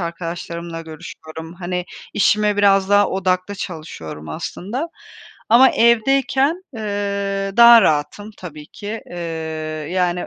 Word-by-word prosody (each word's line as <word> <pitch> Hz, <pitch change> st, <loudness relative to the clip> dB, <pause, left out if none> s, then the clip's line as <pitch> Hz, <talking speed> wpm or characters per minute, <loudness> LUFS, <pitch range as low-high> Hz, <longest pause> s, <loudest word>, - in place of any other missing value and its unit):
arkadaşlarımla 170 Hz, 0 st, -5 dB
görüşüyorum. 160 Hz, 0 st, -10 dB
Hani, 180 Hz, 0 st, -4 dB, 0.3 s
işime 210 Hz, 0 st, +2 dB
biraz 195 Hz, -1 st, +4 dB
daha 205 Hz, 0 st, +4 dB
odaklı 185 Hz, +1 st, -1 dB
çalışıyorum 155 Hz, -, -7 dB
aslında 230 Hz, -, -5 dB, 0.6 s
ama 255 Hz, +3 st, +7 dB
evdeyken, 270 Hz, +8 st, +2 dB
eee, 200 Hz, -2 st, -2 dB
daha 235 Hz, -1 st, +9 dB
rahatım 155 Hz, +8 st, 0 dB
tabii 155 Hz, -4 st, -10 dB
ki, 210 Hz, +6 st, -7 dB
eee, 175 Hz, -, -10 dB, 0.7 s
yani 180 Hz, -1 st, 0 dB
195 Hz, 105 wpm, -20 LUFS, 170-210 Hz, 0.7 s, daha